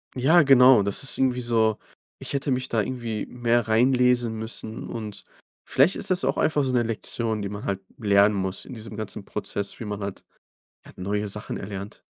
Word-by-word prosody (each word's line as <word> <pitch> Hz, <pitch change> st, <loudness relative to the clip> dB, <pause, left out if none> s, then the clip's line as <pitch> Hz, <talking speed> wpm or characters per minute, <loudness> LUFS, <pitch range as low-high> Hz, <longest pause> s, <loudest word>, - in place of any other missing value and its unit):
Ja, 155 Hz, +8 st, +5 dB
genau. 130 Hz, -5 st, +7 dB
Das 100 Hz, +7 st, -3 dB
ist 135 Hz, -, -4 dB
irgendwie 125 Hz, -2 st, +1 dB
so 115 Hz, -2 st, +2 dB, 0.4 s
ich -, -, -7 dB
hätte 140 Hz, 0 st, -1 dB
mich 130 Hz, 0 st, 0 dB
da 110 Hz, -2 st, +1 dB
irgendwie 115 Hz, -2 st, -4 dB
mehr 120 Hz, -2 st, 0 dB
reinlesen 125 Hz, 0 st, +3 dB
müssen. 110 Hz, 0 st, -5 dB
Und, 110 Hz, -3 st, -6 dB, 0.5 s
vielleicht 145 Hz, +8 st, +4 dB
ist -, -, -5 dB
das 185 Hz, 0 st, +1 dB
auch -, -, 0 dB
einfach 150 Hz, -2 st, +2 dB
so 130 Hz, -1 st, -1 dB
'ne 120 Hz, -, +3 dB
Lektion, 110 Hz, -1 st, -2 dB
die 100 Hz, -, -3 dB
man 100 Hz, 0 st, -7 dB
halt 100 Hz, -1 st, -1 dB, 0.2 s
lernen 100 Hz, -1 st, +4 dB
muss 95 Hz, -1 st, -3 dB
in 130 Hz, -, -9 dB
diesem 110 Hz, -2 st, -9 dB
ganzen 110 Hz, -2 st, -6 dB
Prozess, 100 Hz, -1 st, -4 dB
wie 115 Hz, -, -5 dB
man 105 Hz, 0 st, -4 dB
halt 100 Hz, -1 st, -6 dB, 0.6 s
halt -, -, -15 dB
neue 105 Hz, +2 st, -2 dB
Sachen 105 Hz, +1 st, -5 dB
erlernt. 100 Hz, 0 st, -7 dB
115 Hz, 190 wpm, -25 LUFS, 105-125 Hz, 0.6 s, genau